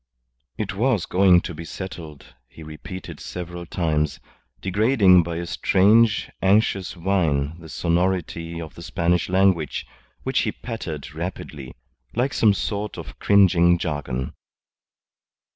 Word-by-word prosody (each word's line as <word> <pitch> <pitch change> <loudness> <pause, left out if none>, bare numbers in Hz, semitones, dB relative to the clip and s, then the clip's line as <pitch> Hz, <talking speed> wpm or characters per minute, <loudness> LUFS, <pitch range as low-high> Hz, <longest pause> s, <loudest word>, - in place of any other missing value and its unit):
It 105 -4 -3
was 110 -2 +1
going 90 -1 +5
to 85 - -6
be 80 +2 -7
settled, 80 -4 -8
he 80 - -13
repeated 90 +5 -9
several 85 -1 -7
times, 75 -4 -1 0.4
degrading 100 -2 +4
by 85 0 -4
a 85 +1 -3
strange, 105 +5 +3
anxious 95 -2 +2
whine 85 -4 0
the 80 -1 -12
sonority 85 -1 -1
of 80 -5 -8
the - - -12
Spanish 85 +1 0
language, 95 -5 +2 0.4
which - - 0
he - - 0
pattered 80 - -6
rapidly, 75 -5 -6 0.4
like 130 +3 0
some 105 -3 +4
sort 105 +1 -3
of - - -9
cringing 90 -4 +5
jargon. 70 -6 -3
90 Hz, 125 wpm, -23 LUFS, 80-95 Hz, 0.4 s, going